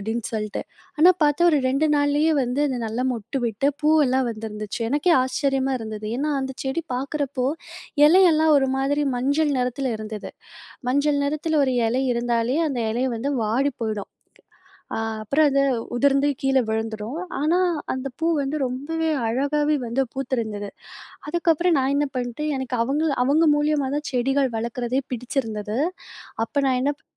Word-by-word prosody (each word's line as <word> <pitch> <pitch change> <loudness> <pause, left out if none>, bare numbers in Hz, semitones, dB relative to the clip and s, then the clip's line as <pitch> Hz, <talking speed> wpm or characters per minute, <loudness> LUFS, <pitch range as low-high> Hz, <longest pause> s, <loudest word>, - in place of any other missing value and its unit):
அப்படின்னு 220 +2 -3
சொல்லிட்டு. 215 -1 -3 0.4
ஆனா 350 +4 +8
பார்த்தா, 295 +3 +2
ஒரு 295 - +4
2 275 +4 +2
நாள்லயே 290 +2 +2
வந்து 250 +3 -1
அது 255 - -2
நல்லா 230 +3 -2
மொட்டு 235 +4 -4
விட்டு, 230 +5 -1 0.2
பூவெல்லாம் 270 -5 +3
வந்திருந்துச்சு. 215 +1 -6
எனக்கே 300 +5 +2
ஆச்சரியமா 270 0 0
இருந்தது! 215 -1 -6
ஏன்னா 295 +3 -1
அந்த 265 0 -3
செடி 270 +5 -1
பார்க்குறப்போ, 275 -1 -2 0.6
இலையெல்லாம் 320 -2 +5
ஒரு 270 -1 +3
மாதிரி 285 +2 +1
மஞ்சள் 285 +4 +1
நிறத்துல 250 +2 -1
இருந்தது. 215 -1 -6 0.6
மஞ்சள் 285 +2 +2
நிறத்துல 305 +2 -1
ஒரு 260 - +1 0.2
இலை 250 +4 0
இருந்தாலே, 235 +1 0
அந்த 260 -4 -2
இலை 240 +3 -1
வந்து 260 +5 -2
வாடி 245 +7 +1
போயிடும். 215 -3 -3 0.9
அ - - -2 0.2
அப்புறம் 290 +8 +3
அது, 275 0 +2 0.4
உதிர்ந்து 275 +2 +3
கீழ 270 0 +2
விழுந்துரும். 220 +5 -3 0.2
ஆனா, 325 +4 +2 0.4
அந்த 260 +1 -4
பூ 325 - +1 0.2
வந்து 275 +3 -2
ரொம்பவே 320 +6 -2 0.2
அழகாவே 295 +5 +1
வந்து 250 +4 0
பூத்திருந்தது. 225 -6 -3 0.6
அதுக்கப்புறம் 340 0 +2
நான் 270 +1 +1
என்ன 290 0 +2
பண்ணிட்டேன், 255 +5 -2
எனக்கு 255 -1 -3
அவங்கள 300 +4 0
அவங்க 300 +5 +3
மூலியமா 295 -2 +1
தான் 295 - -4
செடிகள் 270 +2 +1
வளர்க்குறதே 240 +3 -2
பிடிச்சிருந்தது. 225 -3 -3 0.7
அப்போ 285 +5 -4
நான் 255 -1 +2
என்னப் 290 +1 -2
270 Hz, 145 wpm, -23 LUFS, 235-295 Hz, 0.9 s, ஆனா